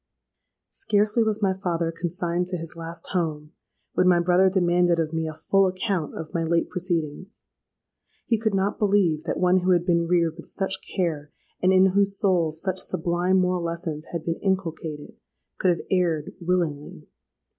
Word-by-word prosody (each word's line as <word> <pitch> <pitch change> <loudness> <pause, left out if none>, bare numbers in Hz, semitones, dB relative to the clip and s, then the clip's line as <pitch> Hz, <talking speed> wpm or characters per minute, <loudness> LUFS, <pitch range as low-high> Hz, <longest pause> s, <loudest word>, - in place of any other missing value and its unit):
"Scarcely 215 - +1
was 220 -1 0
my 190 -1 +3
father 170 -3 -2
consigned 175 +1 -2
to 180 0 -2
his 165 0 -6
last 165 0 -6
home, 155 -4 -2 0.4
when 180 - +3
my 175 -1 +5
brother 180 +2 +4
demanded 175 -2 +2
of 165 -1 -1
me 160 0 -1
a 155 - -5
full 195 +5 +2
account 185 -4 -2
of 160 - -7
my 170 - 0
late 165 +1 +1
proceedings. 175 0 -3 0.8
He 230 -2 +1
could 220 -2 0
not 195 +1 0
believe 195 -7 +2
that - - -2
one 180 +1 +4
who 185 0 +3
had 175 -1 +1
been 170 -2 +2
reared 170 -2 +1
with 165 - -10
such 190 -1 -2
care, 155 -5 -3 0.3
and 185 - +4
in 190 0 +5
whose 200 0 +2
soul 180 -6 +2
such 185 +4 -3
sublime 175 +3 0
moral 180 -1 +1
lessons 165 -2 -4
had 170 -2 -4
been 165 -1 -2
inculcated, 165 -6 -3 0.4
could 185 - +2
have 170 - 0
erred 170 -5 0
willingly. 170 -5 -2
175 Hz, 170 wpm, -25 LUFS, 165-190 Hz, 0.8 s, my